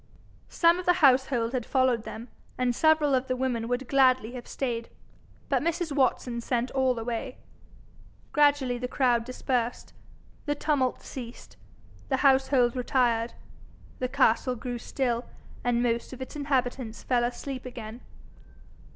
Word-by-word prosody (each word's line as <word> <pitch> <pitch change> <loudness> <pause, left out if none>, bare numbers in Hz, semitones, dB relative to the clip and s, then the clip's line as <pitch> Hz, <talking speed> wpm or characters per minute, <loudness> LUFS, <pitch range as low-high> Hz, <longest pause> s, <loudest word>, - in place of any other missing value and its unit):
Some 340 +1 +4
of 365 - -7
the 355 - +6
household 255 -3 +3
had 255 -2 -1
followed 255 -3 +1
them, 220 +2 -8 0.3
and 250 -1 +1
several 315 -1 +3
of 260 0 +1
the 255 - 0
women 250 -3 -1
would 245 +1 -2
gladly 255 -4 +3
have 245 -1 -8
stayed, 235 -4 -3 0.6
but - - +1
Mrs. 335 0 -1
Watson 255 -3 0
sent 245 +1 -1
all 260 -2 +1
away. 235 +3 -4 0.9
Gradually 285 -4 +3
the 250 - -3
crowd 245 -3 +2
dispersed. 245 -1 -3 0.5
The 290 - +1
tumult 285 -4 0
ceased; 245 -2 -9 0.5
the 265 - +2
household 265 -2 +4
retired. 240 -2 +1 0.7
The 255 - -1
castle 255 -1 +2
grew 245 0 -5
still, 245 -1 -2 0.4
and 240 0 +1
most 235 +1 -1
of 260 - -9
its 260 +3 -7
inhabitants 255 -5 -2
fell 245 -2 +1
asleep 255 +2 -4
again. 235 -1 -8
255 Hz, 140 wpm, -27 LUFS, 240-270 Hz, 0.9 s, the